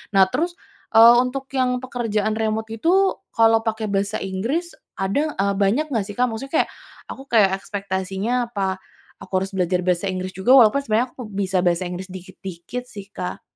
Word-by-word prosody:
Nah 195 - +8
terus, 345 +3 0 0.4
eee, 230 +1 +9
untuk 260 +2 -3
yang 255 -1 +1
pekerjaan 225 -4 -1
remote 220 0 -2
itu 225 +9 -1 0.5
kalau 225 -2 +5
pake 220 0 -1
bahasa 200 +1 0
Inggris 235 - -2 0.2
ada 280 +11 -1
eee, 200 +1 +1
banyak 220 +10 +2
nggak 225 -6 0
sih 205 - -8
Kak 250 - +3
maksudnya 270 +6 -7
kayak - - -16 0.4
aku 270 - -8
kayak 210 -6 +4
ekspektasinya 195 +1 -3 0.2
apa 195 -4 -2 0.4
aku - - -13
harus 195 - -6
belajar 180 -1 0
bahasa 180 +1 0
Inggris 185 0 -4
juga 190 +7 0
walaupun 245 0 +6
sebenarnya 230 0 +1
aku 255 - -9
bisa 195 -2 -2
bahasa 175 0 +2
Inggris 180 +1 -6
dikit-dikit 185 +4 -8
sih 200 -4 -10
Kak. 180 -2 -5
210 Hz, 175 wpm, -22 LUFS, 190-240 Hz, 0.5 s, eee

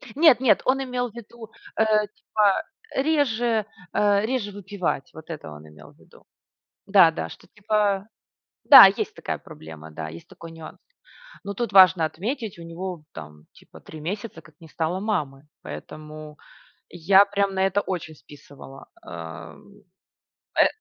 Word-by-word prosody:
Нет, 305 -4 +6
нет, 260 -3 +3
он 270 +1 +1
имел 250 -1 -3
ввиду, 230 0 -12 0.3
э, - - +3 0.2
типа 205 0 0 0.3
реже, 245 -7 +1 0.3
э, 205 0 +2
реже 230 -4 -2
выпивать. 195 -7 -4
Вот 160 +1 -13
это 155 - -8
он 75 +1 -12
имел 75 - -16
в - - -27
виду. - - -21 0.6
Да-да, 170 -5 +4
что, - - -14
типа, 205 -1 -1 0.6
да, 270 -7 +11
есть 195 +1 +1
такая - - -4
проблема, 80 0 -12
да, 80 0 -6
есть 85 +1 -12
такой 165 - -12
нюанс. 165 -1 -11 0.7
Но 200 - -5
тут 230 0 -4
важно 185 -4 +7
отметить, 215 - -5
у - - -9
него 170 0 -7
там, 75 -1 -11
типа, - - -17
3 155 - -11
месяца, 200 +1 -6
как 155 - -20
не 165 - -14
стало 165 +3 -2
мамы. 150 -10 -3 0.2
Поэтому 155 0 -10 0.5
я 190 +4 +4
прям 200 -1 -1
на 190 0 +2
это 195 +1 +1
очень 170 -4 -5
списывала. 140 -2 -14 0.2
Эм. 85 - -11 0.8
Э, - - +7
190 Hz, 145 wpm, -24 LUFS, 155-215 Hz, 0.8 s, да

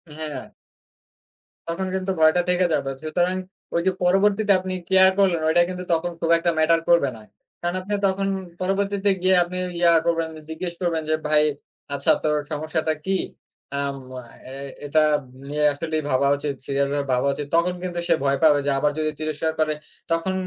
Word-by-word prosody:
হ্যাঁ, 150 -4 -5 1.2
তখন 190 +3 -2
কিন্তু 190 0 -2
ভয়টা 160 +3 +5
থেকে 180 0 +3
যাবে। 135 - 0
সুতরাং 175 +3 0 0.4
ঐ - - -3
যে - - +5
পরবর্তীতে 200 +3 +3
আপনি 185 0 -5 0.2
কেয়ার 190 0 +7
করলেন। 185 -5 +3
ওইটা 160 +2 +4
কিন্তু 180 0 -5
তখন 170 +2 0
খুব 165 - -1
একটা 170 +1 +1
ম্যাটার 165 +1 +4
করবে 170 -5 +4
না। 110 - -13 0.4
কারণ 175 +1 -2
আপনি 200 +3 -5
তখন 195 +1 0 0.3
পরবর্তীতে 200 +1 0
গিয়ে 185 0 +4
আপনি 180 +1 -6 0.2
ইয়া 170 -1 +5
করবেন, 165 -1 +1 0.2
জিজ্ঞেস 170 +2 -4
করবেন 170 -3 0
যে, 155 - +3
"ভাই, 150 0 +4 0.5
আচ্ছা 140 - +3
তোর 150 -1 +1
সমস্যাটা 155 +1 -1
কি?" 190 0 +1 0.6
আম 140 -1 -2 0.2
আ - - -15 0.3
এ - - -6 0.3
এটা 155 +2 +3 0.5
নিয়ে 150 +1 +1
আসলে 155 +2 -4
ভাবা 135 +1 +2
উচিত, 145 0 -3
সিরিয়াস 140 0 0
ভাবে 145 -1 -1
ভাবা 125 +2 +1
উচিত। 145 +1 -5
তখন 170 +2 +2
কিন্তু 175 -1 -3
সে - - +5
ভয় 140 0 +2
পাবে। 150 -2 +6
যে 145 - +2
আবার 150 +1 +2
যদি 155 0 0
তিরস্কার 155 +1 -1
করে। 155 -1 +2 0.4
তখন 165 +3 0
165 Hz, 175 wpm, -23 LUFS, 150-185 Hz, 1.2 s, কেয়ার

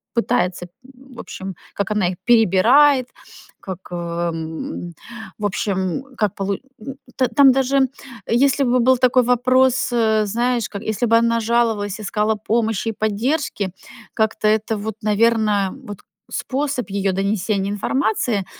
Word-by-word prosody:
пытается, 180 -7 0 0.3
в 260 -1 -16
общем, 190 -1 -7 0.2
как 200 +1 -3
она 210 -4 +1
их 180 - -6
перебирает, 240 +5 +5 0.5
как, 185 -2 -7
эм, 170 0 -4 0.4
в 210 - -4
общем, 190 +1 -2
как 210 -3 0
полу 200 0 -2 0.3
м. 270 +3 -7 0.2
Т 255 -2 +2
там 270 +3 +5
даже, 270 0 +2 0.4
если 275 +4 +2
бы 250 -1 +2
был 255 +2 +4
такой 255 0 +3
вопрос, 255 +1 +2
э, 220 -2 +2
знаешь, 235 +2 0
как 200 -1 -7
если 220 +2 -1
бы 230 0 +5
она 230 0 +1
жаловалась, 225 -3 0
искала 215 +1 0
помощи 225 +1 -1
и - - -1
поддержки, 220 - -1 0.4
как-то 220 -1 0
это 215 0 +1
вот, 215 +1 -5
наверно, 210 -2 +2
вот 205 -2 -8 0.3
способ 270 -2 -2
ее 195 -1 0
донесения 200 +1 -1
информации 215 -1 -1
220 Hz, 135 wpm, -20 LUFS, 200-245 Hz, 0.5 s, перебирает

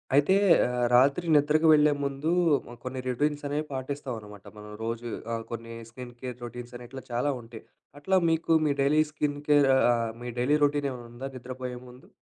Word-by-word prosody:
అయితే, 145 +7 +4 0.3
ఆహ్, 125 0 -1
రాత్రి 140 +7 +4
నిద్రకు 150 +2 +3
వెళ్ళే 150 -1 +5
ముందూ 140 +3 -2 0.4
హ్మ్, 120 - -11
కొన్ని 130 0 -5
రొటీన్సనేవి 145 +3 -1
పాటిస్తావనమాట 125 -7 -6
మనం 105 0 -10
రోజూ. 115 +1 -4 0.2
ఆహ్, 115 0 -3
కొన్నీ 115 0 -7 0.2
స్కిన్ 125 +1 -10
కేర్ 125 -1 -6
రొటీన్సని, 120 +1 -9
ఇట్లా 130 0 -9
చాలా 125 +5 0
ఉంటాయి. 115 -1 -12 0.4
అట్లా 190 +6 +2
మీకు 165 0 +1
మీ 145 - +2
డైలీ 145 +3 +4
స్కిన్ 150 -1 -2
కేర్ 145 -2 +5
ఆహ్, - - +3
ఆహ్, 115 -1 0
మీ 120 - -5
డైలీ 140 +5 +3
రొటీనేవన్నుందా 135 -3 -3
నిద్రపోయే 125 0 -6
ముందు? 125 +1 -16
130 Hz, 160 wpm, -27 LUFS, 120-145 Hz, 0.4 s, వెళ్ళే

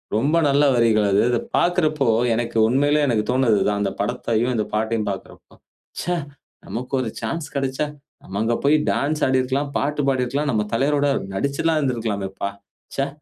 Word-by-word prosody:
ரொம்ப 140 +9 +2
நல்ல 140 +1 +3
வரிகள் 110 -3 +3
அது. 100 - +4
அதபாக்கிறப்போ, 155 +3 +1 0.3
எனக்கு 115 0 -2
உண்மையிலேயே 145 +4 +2
எனக்கு 110 -4 +1
தோன்னது 125 -4 +3
இதான். 105 0 +1
அந்த 100 -1 0
படத்தையும், 120 +2 0
இந்த 105 -2 0
பாட்டையும் 110 0 0
பார்க்கிறப்போ, 95 - -10 0.5
"ச்சே! 175 +1 -1 0.5
நமக்கு 125 +4 -6
ஒரு 120 - -2
சான்ஸ் 145 +8 -3
கிடைச்சா, 135 +1 -1 0.4
நம்ம 100 +2 -5
அங்க 115 +1 +1
போய் 145 +2 +5 0.2
டான்ஸ் 150 +2 -1
ஆடியிருக்கலாம், 130 +2 0
பாட்டு 145 +1 -1
பாடியிருக்கலாம். 135 +3 0
நம்ம 105 -3 0
தலைவரோட 145 +4 +2 0.3
நடிச்சுலாம் 140 +7 0
இருந்திருக்கலாமே 115 -8 -2
பா. 100 - 0 0.5
ச்சே! 135 0 0
125 Hz, 150 wpm, -22 LUFS, 110-145 Hz, 0.5 s, போய்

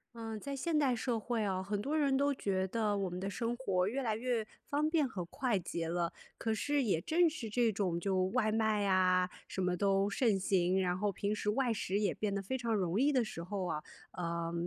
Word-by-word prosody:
嗯， 225 -2 -5
在 280 +5 -5
现 315 +3 0
代 275 -4 +3
社 235 -1 -1
会 230 0 -1
啊， 190 -2 -1
很 205 +1 -2
多 295 +6 -1
人 280 -3 +3
都 285 +1 +3
觉 190 -5 0
得 210 0 0
我 195 -2 -1
们 180 +1 -5
的 195 - -3
生 235 +3 -2
活 185 -8 +1
越 265 +6 -1
来 220 -3 0
越 235 -1 -1 0.2
方 295 +2 +1
便 310 -3 +2
和 185 -6 -4
快 235 +5 0
捷 170 -2 -3
了。 170 -1 -1 0.2
可 225 - -1
是 285 +6 +1
也 190 -8 +1
正 340 - +3
是 305 -8 -4
这 230 +1 +2
种 185 -4 -1
就 185 0 +1
外 215 +2 +1
卖 220 -1 +2
呀， 185 -2 +3 0.2
什 - - -6
么 180 -1 +1
都 195 +1 +2
盛 210 -2 +2
行， 185 -1 +2
然 180 -1 +1
后 205 +2 0
平 200 +1 -1
时 210 - -1
外 245 +2 +1
食 200 -2 -1
也 205 -1 +1
变 205 -2 -2
得 200 - -2
非 230 +7 -2
常 230 -2 0
容 190 +2 +1
易 290 +2 +4
的 255 -4 +3
时 190 -6 -6
候 190 +1 -3
啊， 155 -3 -3 0.3
呃， 170 -1 -3
210 Hz, 250 characters per minute, -33 LUFS, 185-245 Hz, 0.3 s, 易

